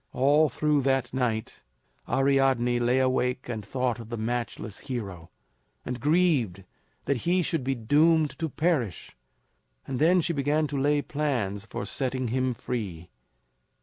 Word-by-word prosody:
All 145 Hz, +4 st, +4 dB
through 150 Hz, -2 st, +1 dB
that 135 Hz, -2 st, 0 dB
night 120 Hz, -4 st, -2 dB, 0.5 s
Ariadne 135 Hz, -2 st, +2 dB
lay 120 Hz, +2 st, +2 dB
awake 130 Hz, -1 st, +1 dB
and 110 Hz, -3 st, -4 dB
thought 125 Hz, +2 st, -1 dB
of 115 Hz, -1 st, -9 dB
the 120 Hz, -, -4 dB
matchless 115 Hz, -2 st, -3 dB
hero, 100 Hz, -11 st, -6 dB, 0.6 s
and 125 Hz, 0 st, -4 dB
grieved 145 Hz, -, +2 dB, 0.4 s
that 140 Hz, -, +1 dB
he 175 Hz, +8 st, +1 dB
should 160 Hz, -4 st, -1 dB
be 135 Hz, +1 st, 0 dB
doomed 150 Hz, +6 st, +3 dB
to 165 Hz, -1 st, -1 dB
perish; 140 Hz, -, -1 dB, 0.7 s
and 130 Hz, -2 st, -4 dB
then 175 Hz, +4 st, +5 dB
she 170 Hz, 0 st, 0 dB
began 150 Hz, +2 st, +1 dB
to 140 Hz, -2 st, -2 dB
lay 145 Hz, +1 st, +2 dB
plans 115 Hz, -9 st, -2 dB
for -, -, -5 dB
setting 130 Hz, -2 st, -2 dB
him 130 Hz, +1 st, 0 dB
free. 100 Hz, -9 st, -5 dB
130 Hz, 145 wpm, -27 LUFS, 120-145 Hz, 0.7 s, then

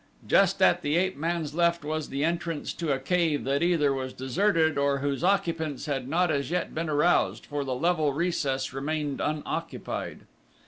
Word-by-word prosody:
Just -, -, +4 dB
at -, -, +4 dB
the 145 Hz, +1 st, 0 dB
ape 185 Hz, +1 st, +1 dB
man's 160 Hz, 0 st, -2 dB
left 170 Hz, -1 st, +1 dB
was 155 Hz, 0 st, -3 dB
the 140 Hz, +1 st, -2 dB
entrance 165 Hz, -1 st, -2 dB
to 165 Hz, -4 st, -2 dB
a 135 Hz, -, +2 dB
cave 160 Hz, -1 st, 0 dB
that 140 Hz, +3 st, 0 dB
either 165 Hz, -5 st, +3 dB
was 130 Hz, -1 st, -4 dB
deserted 160 Hz, +4 st, +1 dB
or 140 Hz, 0 st, +2 dB
whose 140 Hz, +2 st, -2 dB
occupants 165 Hz, -7 st, 0 dB
had 135 Hz, -4 st, -2 dB
not 170 Hz, +4 st, +2 dB
as 140 Hz, -2 st, -1 dB
yet 180 Hz, +1 st, -2 dB
been 160 Hz, 0 st, -2 dB
aroused, 150 Hz, +4 st, +2 dB
for 145 Hz, -1 st, -3 dB
the 130 Hz, -2 st, -2 dB
level 160 Hz, 0 st, +1 dB
recess 140 Hz, -5 st, -1 dB
remained 145 Hz, +1 st, -2 dB
unoccupied. 150 Hz, 0 st, -4 dB
155 Hz, 175 wpm, -27 LUFS, 140-170 Hz, -, Just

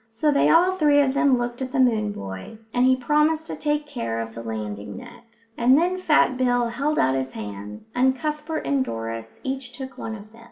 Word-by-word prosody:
So 230 Hz, +7 st, +1 dB
they 285 Hz, -, +3 dB
all 365 Hz, +3 st, +4 dB
three 295 Hz, -4 st, +4 dB
of 265 Hz, -2 st, +1 dB
them 280 Hz, -3 st, +3 dB
looked 240 Hz, +1 st, -3 dB
at 260 Hz, -1 st, -3 dB
the 275 Hz, -, -1 dB
moon 220 Hz, -5 st, +3 dB
boy, 95 Hz, -, -7 dB, 0.2 s
and 250 Hz, +1 st, +3 dB
he 260 Hz, -, +5 dB
promised 300 Hz, +5 st, +1 dB
to -, -, -5 dB
take 295 Hz, 0 st, -1 dB
care 115 Hz, -, -4 dB
of 115 Hz, 0 st, -5 dB
the 115 Hz, -, -7 dB
landing 105 Hz, -3 st, -5 dB
net; 230 Hz, -, -14 dB
and 250 Hz, +3 st, +5 dB
then 360 Hz, +3 st, +1 dB
Fat 300 Hz, -7 st, +3 dB
Bill 245 Hz, -2 st, +2 dB
held 280 Hz, +6 st, -1 dB
out 130 Hz, -, +3 dB
his 130 Hz, 0 st, -2 dB
hands, 105 Hz, -, -8 dB
and 260 Hz, +1 st, +3 dB
Cuthbert 305 Hz, +2 st, -3 dB
and 275 Hz, -2 st, +2 dB
Doris 115 Hz, -, -6 dB
each 265 Hz, -1 st, -4 dB
took 265 Hz, -1 st, -8 dB
one 220 Hz, -, -4 dB
of 215 Hz, 0 st, -12 dB
them. 230 Hz, -, -17 dB
250 Hz, 215 wpm, -24 LUFS, -, 0.2 s, he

